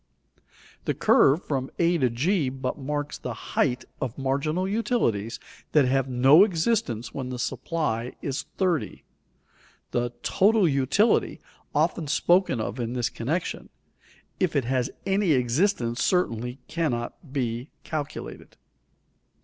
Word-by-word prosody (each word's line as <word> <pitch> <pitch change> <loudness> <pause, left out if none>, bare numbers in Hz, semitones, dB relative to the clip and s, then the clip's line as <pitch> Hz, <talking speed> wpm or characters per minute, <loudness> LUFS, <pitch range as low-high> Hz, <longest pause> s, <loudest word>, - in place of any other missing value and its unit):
The - - 0
curve 145 +6 +4
from 135 -2 -2
a 170 +1 +3
g 145 - +1
but 130 +2 -4
marks 145 +1 -3
the - - -5
height 125 -4 -1 0.2
of 125 -3 -3
marginal 140 +7 0
utilities 190 - 0 0.3
that 150 -3 +5
have 135 +1 +1
no 135 +8 +7
existence 170 - 0
when 130 -2 -4
the 125 - -4
supply 125 -3 -2
is 140 +1 -3
30. 180 -5 -1 0.9
The 120 0 0
"total 205 -1 +4
utility," 140 - +2 0.4
often 160 -4 +1
spoken 175 -2 +3
of 110 +2 -3
in 120 0 -2
this 125 -2 0
connection, 155 +10 -3 0.7
if 180 -5 +1
it 140 -4 +2
has 125 0 0 0.2
any 195 -3 +2
existence 125 - +1
certainly 125 - 0
cannot 140 -2 -3
be 125 -1 -2
calculated. 150 -1 -6
140 Hz, 120 wpm, -26 LUFS, 125-170 Hz, 0.9 s, no